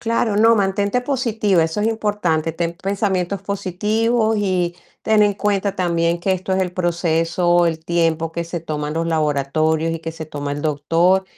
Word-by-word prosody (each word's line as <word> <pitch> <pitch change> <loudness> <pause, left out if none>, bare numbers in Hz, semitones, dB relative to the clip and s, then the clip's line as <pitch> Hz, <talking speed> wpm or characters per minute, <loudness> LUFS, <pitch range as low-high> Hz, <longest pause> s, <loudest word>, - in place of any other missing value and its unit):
Claro, 230 -2 0
no, 225 +2 +5
mantente 200 +2 +1
positiva, 225 - +1
eso 160 +5 -2
es 215 - +2
importante. 200 -8 0
Ten 170 0 -2
pensamientos 195 -1 -1
positivos 215 +4 0
y 180 -3 0 0.3
ten 215 -1 +3
en 205 - +2
cuenta 200 -1 0
también 170 -2 0
que 190 - -1
esto 185 +1 -2
es 190 - +2
el 180 -1 -3
proceso, 175 0 +1
el 160 -1 -2
tiempo 165 -1 0
que 170 +1 -4
se 170 0 -5
toman 150 -1 -4
los 165 0 -1
laboratorios 155 +1 0
y 165 - -3
que 165 0 -6
se 160 -1 -7
toma 145 -1 -5
el 145 - -4
doctor 165 +5 +2
175 Hz, 175 wpm, -20 LUFS, 165-205 Hz, 0.3 s, no